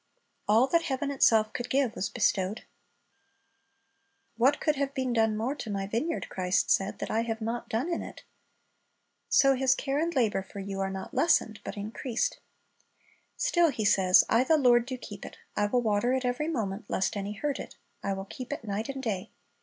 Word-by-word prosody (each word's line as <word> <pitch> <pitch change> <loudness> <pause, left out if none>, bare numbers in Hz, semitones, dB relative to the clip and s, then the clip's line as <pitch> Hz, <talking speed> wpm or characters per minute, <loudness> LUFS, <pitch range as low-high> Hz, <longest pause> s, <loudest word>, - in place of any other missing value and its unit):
All 220 +4 +5
that 335 +5 +2
heaven 280 -2 -2
itself 220 -5 +3
could 240 - -4
give 265 -4 +1
was 195 - -2
bestowed. 200 -2 0 1.7
"What 260 +5 +3
could 305 - +1
have 275 0 -2
been 260 -2 -1
done 220 -2 +2
more 235 +5 -1
to 275 -6 -7
My 195 -1 -2
vineyard," 240 +11 -2
Christ 185 0 0
said, 195 +1 +1
"that - - -4
I 225 - +1
have 225 -1 -3
not 230 +2 -4
done 230 +8 -1
in 340 - -2
it?"* - - -9 1.1
So 275 -1 +5
His 260 -1 +3
care 275 0 -1
and 335 +2 0
labor 220 -6 +2
for 195 +1 -10
you 195 0 -5
are 195 0 0
not 190 0 -6
lessened, 220 -10 +2
but - - -6
increased. 225 +4 -2 1.0
Still 345 -9 +3
He 220 -7 -2
says, 185 -2 +5
"I 230 +3 +3
the 315 +4 +3
Lord 240 -3 +4
do 260 -1 -4
keep 205 -5 -9
it; - - -9 0.2
I 205 - +1
will 245 +3 +1
water 220 +3 +1
it 260 -1 0
every 250 +5 -1
moment; 215 -9 -3
lest 190 - -1
any 200 +1 -3
hurt 285 +6 -2
it, - - -8 0.3
I 200 - -1
will 195 0 -5
keep 250 +6 -8
it 285 - -4
night 215 +2 -3
and 270 -1 -5
day." 200 -6 -3
230 Hz, 195 wpm, -28 LUFS, 205-270 Hz, 1.7 s, All